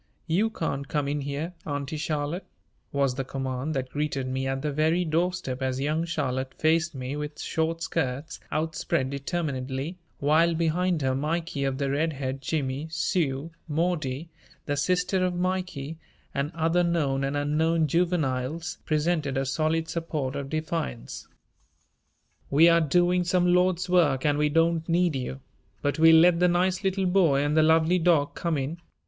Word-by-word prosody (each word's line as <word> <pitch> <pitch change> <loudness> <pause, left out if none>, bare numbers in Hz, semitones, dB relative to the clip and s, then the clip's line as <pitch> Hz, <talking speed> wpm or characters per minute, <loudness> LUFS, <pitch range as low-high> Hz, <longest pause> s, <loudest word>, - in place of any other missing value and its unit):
"You 185 +7 +2
can't 140 -9 -3
come 145 -1 -1
in 145 +1 -1
here, 145 +5 -4
Auntie 145 0 -3
Charlotte," 150 +3 -2 0.4
was 140 -2 +1
the 135 +1 -3
command 135 +2 -3
that 130 -1 -3
greeted 145 -3 -2
me 130 +1 -2
at 135 +1 -2
the 150 - 0
very 160 +5 +2
doorstep 160 -5 -1
as 130 0 -1
young 155 +4 0
Charlotte 130 -5 -2
faced 165 +1 +1
me 130 +1 -4
with 150 0 -5
short 165 +1 -1
skirts 140 +1 -2
outspread 155 -3 -1
determinedly, 140 +1 -3 0.2
while 160 +4 +3
behind 170 0 +1
her 130 0 +1
Mikey 155 +1 -2
of 135 -1 -1
the 140 -1 -1
red 155 +3 0
head, 135 -1 -4
Jimmy, 140 0 -2
Sue, 160 -2 -1 0.2
Maudie, 160 -2 -1 0.4
the 145 - -1
sister 180 +5 +1
of 180 -1 0
Mikey, 175 -4 -2 0.3
and 140 +2 -1
other 165 +2 +2
known 150 -6 +1
and 140 +1 -1
unknown 160 +3 +2
juveniles, 160 -2 -1
presented 155 -3 0
a 135 - 0
solid 160 +3 0
support 155 -5 -3
of 140 -1 -4
defiance. 155 -5 -4 1.2
"We 155 +4 +6
are 170 0 +5
doing 175 +3 +3
some 180 0 +2
Lord's 180 0 +2
work 160 -7 +3
and 145 0 +2
we 150 0 +3
don't 165 +1 +1
need 170 -2 +2
you, 70 - -4 0.4
but 145 +1 0
we'll 160 0 +8
let 175 0 +5
the 180 - +5
nice 180 +2 +1
little 190 0 0
boy 175 -7 +3
and 145 +1 0
the 160 - +6
lovely 160 +3 +4
dog 160 -4 +3
come 170 -3 -1
in. 140 +5 -3
155 Hz, 160 wpm, -26 LUFS, 140-170 Hz, 1.2 s, we'll